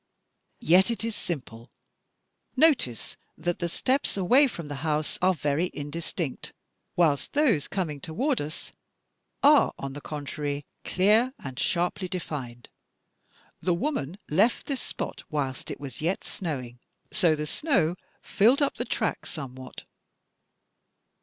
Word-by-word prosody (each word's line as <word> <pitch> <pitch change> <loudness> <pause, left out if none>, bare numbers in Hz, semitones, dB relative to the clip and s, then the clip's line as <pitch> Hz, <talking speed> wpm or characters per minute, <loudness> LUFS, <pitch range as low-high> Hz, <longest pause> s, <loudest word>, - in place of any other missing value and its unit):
"Yet 185 +6 +5
it 230 -1 -2
is 230 -1 -2
simple. 125 -7 -5 0.9
Notice 270 - +2 0.2
that 175 +2 -2
the 170 - -1
steps 260 +6 +1
away 250 +10 +5
from 170 - -7
the 145 -1 -5
house 155 -1 -1
are 185 0 +4
very 150 +3 0
indistinct, 150 0 -4 0.4
whilst 155 -5 +2
those 280 - +3
coming 160 -7 -2
toward 255 - 0
us 150 +2 -6 0.7
are, 290 +1 +6
on 135 -1 -5
the 145 - -7
contrary, 145 -1 -4 0.2
clear, 220 +8 +3
and 130 -1 -7
sharply 180 +3 0
defined. 140 -10 -5 0.9
The 180 -2 +2
woman 185 - -2
left 200 +10 +3
this 275 -4 -2
spot - - -4
whilst 135 -4 -2
it - - -5
was 140 -3 -7
yet 175 +5 0
snowing; 130 -9 -4 0.3
so 175 -7 +4
the 150 0 -3
snow 175 - +1 0.3
filled 245 +8 +4
up 280 - 0
the - - -2
tracks - - -1
somewhat. 130 -4 -7
165 Hz, 130 wpm, -27 LUFS, 145-210 Hz, 0.9 s, are